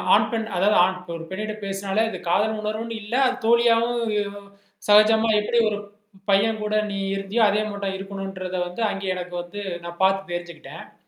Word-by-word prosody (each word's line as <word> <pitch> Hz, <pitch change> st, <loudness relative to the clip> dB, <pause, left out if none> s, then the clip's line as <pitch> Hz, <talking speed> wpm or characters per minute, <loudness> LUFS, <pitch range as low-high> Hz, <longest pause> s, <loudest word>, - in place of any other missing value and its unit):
ஆண், -, -, +3 dB
பெண் 225 Hz, -1 st, -2 dB
அதாவது 205 Hz, +3 st, +3 dB
ஆண் 185 Hz, 0 st, -2 dB, 0.2 s
ஒரு 165 Hz, 0 st, -7 dB
பெண்ணிட்ட 215 Hz, +3 st, -3 dB
பேசினாலே 195 Hz, +2 st, -1 dB
அது -, -, -5 dB
காதல் 215 Hz, +4 st, +2 dB
உணர்வுன்னு 220 Hz, +1 st, -4 dB
இல்ல. 210 Hz, -, -8 dB
அது 255 Hz, 0 st, -1 dB
தோழியாகவும் 235 Hz, -1 st, +3 dB, 0.3 s
ம் 200 Hz, -, -18 dB, 0.4 s
சகஜமா 220 Hz, +2 st, +6 dB
எப்பிடி 235 Hz, +3 st, +1 dB
ஒரு 205 Hz, -1 st, -3 dB, 0.5 s
பையன் 215 Hz, +2 st, +2 dB
கூட 210 Hz, 0 st, -2 dB, 0.2 s
நீ 200 Hz, -, -3 dB, 0.2 s
இருந்தியோ! 195 Hz, +4 st, 0 dB
அதே 210 Hz, +1 st, +1 dB
மாட்டம் 200 Hz, -1 st, -3 dB
இருக்கணும்ன்றத 195 Hz, -1 st, -6 dB
வந்து 180 Hz, +6 st, -6 dB
அங்கே 195 Hz, -1 st, -3 dB
எனக்கு 180 Hz, 0 st, -6 dB
வந்து 205 Hz, +4 st, -7 dB, 0.2 s
நான் 170 Hz, +1 st, -7 dB
பார்த்து 195 Hz, -1 st, +2 dB
தெரிஞ்சுக்கிட்டேன். 175 Hz, -2 st, -8 dB
205 Hz, 170 wpm, -23 LUFS, 190-220 Hz, 0.5 s, சகஜமா